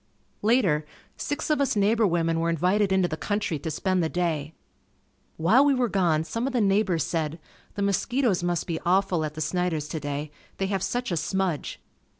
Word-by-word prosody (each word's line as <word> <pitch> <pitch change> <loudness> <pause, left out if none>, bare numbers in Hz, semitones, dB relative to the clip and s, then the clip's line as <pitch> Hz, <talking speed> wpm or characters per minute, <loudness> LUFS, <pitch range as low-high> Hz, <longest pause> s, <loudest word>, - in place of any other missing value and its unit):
Later, 205 -9 +3 0.3
six 290 +2 -3
of 300 - +2
us 275 - +1
neighbor 210 +2 +3
women 165 -2 +1
were 165 +1 0
invited 185 +5 +2
into 190 -2 +3
the 155 - -3
country 205 -3 -2
to 160 - -4
spend 185 +4 0
the 160 - 0
day. 160 -4 -2 0.8
While 205 - +5
we 285 -1 +4
were 250 -2 +1
gone 170 -6 +2
some 230 +10 -3
of 270 - -3
the 250 - +2
neighbors 195 -5 +2
said, 160 -2 -2 0.4
"The 200 - -1
mosquitoes 205 +1 +1
must 175 -1 -1
be 165 -2 -3
awful 185 -2 +2
at 155 0 -4
the 155 - -5
Snider's 160 -1 -1
today 145 -1 -4 0.3
they 195 - -1
have 195 -1 -1
such 245 0 -2
a 170 - 0
smudge." 185 -2 -2
180 Hz, 185 wpm, -26 LUFS, 160-205 Hz, 0.8 s, While